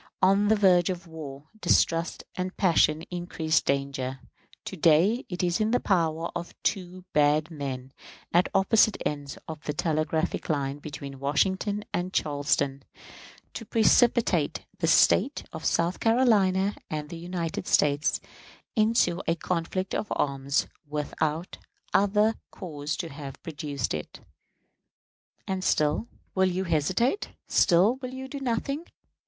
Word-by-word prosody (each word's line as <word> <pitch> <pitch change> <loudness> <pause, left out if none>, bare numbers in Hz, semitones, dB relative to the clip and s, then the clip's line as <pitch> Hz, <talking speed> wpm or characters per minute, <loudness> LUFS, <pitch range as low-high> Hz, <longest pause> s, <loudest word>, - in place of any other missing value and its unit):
On 195 +2 +4
the 220 - +5
verge 185 -4 +4
of 180 -1 -4
war, 150 -4 -8 0.2
distrust 170 -2 +2
and 185 0 -4
passion 160 -4 +3
increase 170 -3 0
the - - -14
danger. 135 -1 -3 0.5
To - - -5
day 175 - +3
it 180 0 -3
is 175 -1 +1
in 215 - +2
the 245 +2 +2
power 165 -3 0
of 175 0 -5
two 185 -2 -2
bad 150 +2 +3
men, 135 -3 -5 0.4
at 175 +2 +5
the - - -7
opposite 210 +2 +4
ends 145 -1 -3
of 155 -2 -7
the 150 - -1
telegraphic 160 -1 -1
line 140 -2 -1
between 140 -2 -8
Washington 190 +9 0
and 180 +1 -1
Charleston, 145 -2 0 0.7
to - - -6
precipitate 225 - +3
the - - +1
State - - +4
of - - -7
South 170 +2 +1
Carolina 210 -5 +3 0.2
and 150 -1 -4
the 170 - -7
United 175 0 -4
States 145 +3 +2 0.6
into 215 -5 +2
a 165 - +2
conflict 180 +2 -2
of 215 - -1
arms 140 0 0 0.2
without 150 +3 -2 0.3
other 210 +2 +3 0.2
cause 150 -4 -5
to 165 - -4
have 140 -2 -8
produced 145 -3 -3
it. 75 -1 -6 1.3
And 190 -1 -2
still 150 +7 +1 0.3
will 190 0 +3
you 185 +1 -1
hesitate; 185 - 0 0.2
still 195 +7 +4
will 255 -1 -6
you 265 0 -6
do 280 +1 -6
nothing? 275 +5 -2
170 Hz, 135 wpm, -27 LUFS, 150-195 Hz, 1.3 s, the